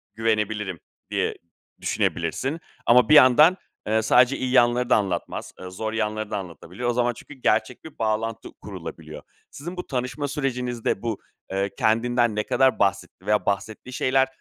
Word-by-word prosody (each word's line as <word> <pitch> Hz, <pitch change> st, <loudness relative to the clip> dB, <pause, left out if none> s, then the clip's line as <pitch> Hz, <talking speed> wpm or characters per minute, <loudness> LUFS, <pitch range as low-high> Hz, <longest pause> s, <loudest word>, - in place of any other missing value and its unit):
güvenebilirim, 105 Hz, -4 st, -1 dB, 0.3 s
diye -, -, 0 dB, 0.5 s
düşünebilirsin. 140 Hz, +5 st, -1 dB, 0.3 s
Ama 125 Hz, +3 st, +5 dB
bir 155 Hz, -, +7 dB
yandan, 150 Hz, +7 st, +7 dB, 0.3 s
eee, 110 Hz, +1 st, +2 dB
sadece 125 Hz, +4 st, +4 dB
iyi 130 Hz, -1 st, -2 dB
yanları 120 Hz, 0 st, +3 dB
da -, -, +6 dB
anlatmaz. 95 Hz, -5 st, -3 dB
Eee, 90 Hz, -, -7 dB
zor 110 Hz, +4 st, -4 dB
yanları 110 Hz, -1 st, -2 dB
da -, -, -1 dB
anlatabiliyor. 95 Hz, +5 st, -5 dB
O -, -, +1 dB
zaman, 120 Hz, 0 st, +1 dB
çünkü 150 Hz, -, -12 dB
gerçek 125 Hz, -2 st, 0 dB
bir 160 Hz, -, -12 dB
bağlantı 115 Hz, +1 st, -2 dB
kurulabiliyor. -, -, -8 dB, 0.3 s
Sizin 175 Hz, +6 st, -8 dB
bu 180 Hz, -, -5 dB
tanışma 130 Hz, +2 st, -3 dB
sürecinizde 125 Hz, -7 st, -2 dB
bu, 115 Hz, -3 st, -3 dB, 0.3 s
eee, 100 Hz, +1 st, 0 dB
kendinden 120 Hz, 0 st, +2 dB
ne 105 Hz, -, 0 dB
kadar 130 Hz, +4 st, +2 dB
bahsetti 95 Hz, -1 st, -1 dB
veya 105 Hz, 0 st, +1 dB
bahsettiği 110 Hz, +5 st, -3 dB
şeyler 130 Hz, +2 st, +2 dB
120 Hz, 155 wpm, -24 LUFS, 105-130 Hz, 0.5 s, bir